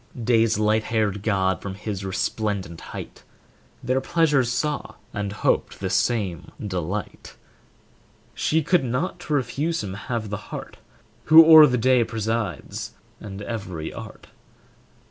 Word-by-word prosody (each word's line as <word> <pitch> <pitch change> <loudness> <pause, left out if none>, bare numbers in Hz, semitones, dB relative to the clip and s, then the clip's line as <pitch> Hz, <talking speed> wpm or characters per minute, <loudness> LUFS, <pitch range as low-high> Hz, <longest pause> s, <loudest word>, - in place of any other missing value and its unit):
Day's 115 -2 +3
light 110 +1 +2
haired 105 -3 0
god 95 -3 0
from 100 -1 -6
his 100 -1 -5
resplendent 95 -2 -2
height - - -8 0.6
Their 130 +2 +1
pleasures 145 -6 +2
saw, 145 +4 -2 0.2
and 100 -1 -3
hoped 105 - 0
the - - -3
same 100 -9 0
delight; 95 0 -5 1.0
She 160 0 +1
could 175 +1 +2
not 125 +9 -2
to 155 - -4
refuse 145 +4 -1
him 95 -2 -5
have 110 +1 -4
the 105 - -2
heart, - - -7 0.5
Who 160 +1 +9
o'er 160 -1 +10
the 125 -2 0
day 125 +1 +4
presides 110 - -3 0.2
and 100 -1 -8
every 95 -8 -5
art. - - -10
110 Hz, 130 wpm, -24 LUFS, 100-130 Hz, 1.0 s, o'er